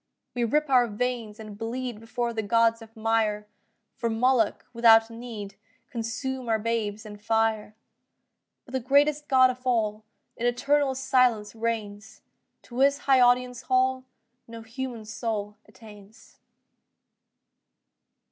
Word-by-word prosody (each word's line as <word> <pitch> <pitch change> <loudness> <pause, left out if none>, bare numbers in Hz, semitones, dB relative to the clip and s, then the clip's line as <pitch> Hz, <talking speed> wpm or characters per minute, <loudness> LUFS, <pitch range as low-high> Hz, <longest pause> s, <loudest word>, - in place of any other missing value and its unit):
We 245 - -1
rip 300 +6 +1
our 250 -3 +4
veins 225 -1 -3
and 215 -2 -9
bleed 235 +1 -5
Before 235 +1 -3
the 220 - -2
gods 230 +2 +2
of 225 0 -14
mire; 220 -2 0 0.5
For 235 - -2
Moloch, 230 -1 +1
without 225 -1 +5
need, 225 -4 -8 0.4
Consume 250 +1 -4
our 220 - +3
babes 220 -1 -2
in 210 -1 -9
fire; 220 0 0 0.9
But - - -15
the 260 - -1
greatest 290 +4 +2
God 260 -1 +5
of 250 - -10
all 220 -4 0 0.3
In 240 - 0
eternal 275 +3 +1
silence 250 -5 +2
reigns; 220 -2 -4 0.4
To 240 +1 -8
His 280 +1 +4
high 270 -2 +5
audience 250 0 +3
hall 260 0 +1 0.4
No 230 0 -10
human 235 -1 -6
soul 210 -1 -4
attains. 210 0 -16
230 Hz, 130 wpm, -26 LUFS, 220-255 Hz, 0.9 s, without